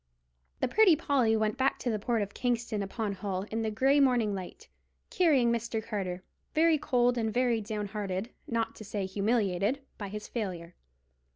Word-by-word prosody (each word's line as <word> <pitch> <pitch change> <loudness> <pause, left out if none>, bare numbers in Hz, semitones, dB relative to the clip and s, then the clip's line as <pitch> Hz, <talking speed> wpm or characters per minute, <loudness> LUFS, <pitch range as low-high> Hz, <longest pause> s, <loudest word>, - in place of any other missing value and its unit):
The - - +2
Pretty 385 - +5
Polly 260 -8 +2
went 215 +1 0
back 270 +1 +2
to 245 - -2
the 215 - -1
port 230 0 0
of 200 0 -7
Kingston 235 -3 -1
upon 200 +1 -3
Hull 190 -1 -3
in 225 +1 -1
the 220 - 0
grey 265 +7 +3
morning 245 -6 +3
light, 185 -2 -7 0.4
carrying 295 - +4
Mr. 230 -1 -1
Carter, 190 -5 -4 0.3
very 320 -1 +4
cold 245 -3 +2
and 220 -1 0
very 240 -1 +1
down 210 0 -3
hearted—not 210 +3 -3
to - - -8
say 205 -1 -3
humiliated—by 205 +3 -1
his 210 +1 -6
failure. 180 -7 -4
225 Hz, 165 wpm, -30 LUFS, 205-245 Hz, 0.4 s, Pretty